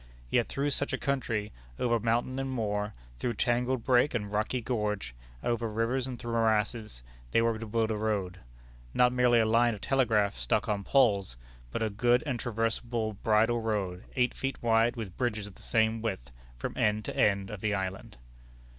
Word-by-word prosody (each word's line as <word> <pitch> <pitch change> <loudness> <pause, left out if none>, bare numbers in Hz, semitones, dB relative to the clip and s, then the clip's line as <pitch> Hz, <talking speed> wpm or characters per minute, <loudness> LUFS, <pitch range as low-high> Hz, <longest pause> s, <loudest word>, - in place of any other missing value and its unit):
Yet 120 - +3
through 145 +1 -1
such 140 +1 -1
a - - +1
country, 115 -6 -1 0.3
over 120 -1 +1
mountain 120 +4 0
and 135 0 -2
moor, 105 -4 -2 0.2
through 120 -2 -1
tangled 125 +1 +1
brake 125 +1 +3
and 105 -3 -2
rocky 105 +4 0
gorge, 105 - -2 0.3
over 115 -1 0
rivers 115 +4 0
and 125 -2 -5
through 120 0 -6
morasses, 110 - 0 0.3
they - - +3
were 115 -1 +1
to 115 - -6
build 110 +1 0
a - - 0
road 100 -4 -1 0.6
not 125 0 +4
merely 125 -1 +4
a 110 - +4
line 115 +1 +3
of 100 - -12
telegraph 115 -7 +2
stuck - - 0
on 100 -2 -1
poles, 100 - +2 0.3
but 110 - -2
"a 110 - -1
good 120 +6 +3
and 130 -5 -2
traversable 115 -1 -1
bridle 110 +3 +2
road, 100 -5 -2
eight 125 -1 +2
feet 135 0 -3
wide, 115 +1 +3
with 110 -7 -6
bridges 110 -4 -1
of 105 - -10
the - - -18
same 110 0 +1
width," 95 - -4 0.3
from - - -4
end 105 0 +1
to - - -5
end 100 -2 +2
of 105 -3 -7
the 105 -1 +1
island. 95 -6 -4
115 Hz, 185 wpm, -29 LUFS, 105-120 Hz, 0.6 s, not